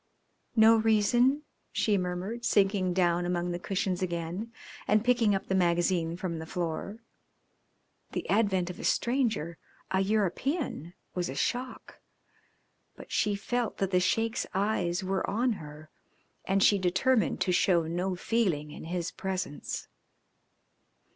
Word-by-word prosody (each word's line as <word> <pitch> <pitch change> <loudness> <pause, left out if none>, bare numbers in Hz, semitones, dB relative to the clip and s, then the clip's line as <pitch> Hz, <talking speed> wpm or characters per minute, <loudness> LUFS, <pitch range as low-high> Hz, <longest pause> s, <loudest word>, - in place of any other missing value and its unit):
"No 225 0 +7
reason," 230 +6 +3 0.3
she 210 - +1
murmured, 185 +5 -3
sinking 195 -5 +2
down 175 -1 +2
among 175 0 -1
the 175 - -3
cushions 185 -1 -2
again 175 +5 -3 0.4
and 215 +2 +3
picking 235 -5 +3
up 195 - -3
the - - -2
magazine 175 -2 +1
from 175 -3 -3
the 160 - -7
floor. 180 +6 -4 1.1
The - - -3
advent 190 -4 +2
of - - -12
a - - -7
stranger 230 - 0 0.3
a 190 - +2
European 205 - -1 0.2
was 180 -1 -2
a - - -5
shock, 250 +1 -3 1.0
but - - -12
she 210 -1 +1
felt 240 +3 -2
that 195 -1 -1
the 180 - +4
Sheik's 225 +6 0
eyes 195 -2 0
were 190 0 -1
on 235 +5 +1
her 150 +1 -11 0.5
and 195 0 +2
she 205 - +5
determined 215 +6 +2
to 185 - +2
show 175 -1 +3
no 175 +3 -2
feeling 175 -8 0
in 155 - -9
his 175 +1 -3
presence. 185 -6 -4
190 Hz, 135 wpm, -29 LUFS, 175-220 Hz, 1.1 s, No